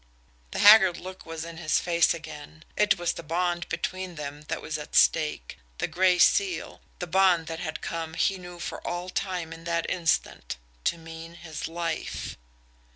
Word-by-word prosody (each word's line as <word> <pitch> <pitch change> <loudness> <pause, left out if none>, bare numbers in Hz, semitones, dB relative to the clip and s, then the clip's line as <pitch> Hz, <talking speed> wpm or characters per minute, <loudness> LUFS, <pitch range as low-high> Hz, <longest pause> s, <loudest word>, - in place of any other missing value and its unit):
The - - -6
haggard 200 -4 +8
look 185 -1 -9
was 165 0 -5
in 170 -1 -8
his 160 -2 +1
face 170 -1 +3
again. 155 -1 -7
It 210 -1 +3
was 175 -1 0
the - - -7
bond 175 +2 -1
between 185 -1 -3
them 145 -1 -6
that 160 - -2
was 155 -1 -4
at 150 - -8
stake 150 - +3 0.2
the - - 0
Gray 180 +2 +3
Seal 390 - +2 0.2
the 180 - -4
bond 180 -1 +4
that 165 0 -5
had 155 -2 -4
come, 165 -1 -4
he 195 +2 +1
knew 175 -1 -9
for 175 - -5
all 175 +1 -4
time 180 -4 -3
in 165 0 -11
that 170 0 0
instant, 165 - 0 0.3
to - - +2
mean 165 0 -10
his 160 -3 -6
life. 165 0 -3
170 Hz, 175 wpm, -27 LUFS, 160-180 Hz, 0.3 s, haggard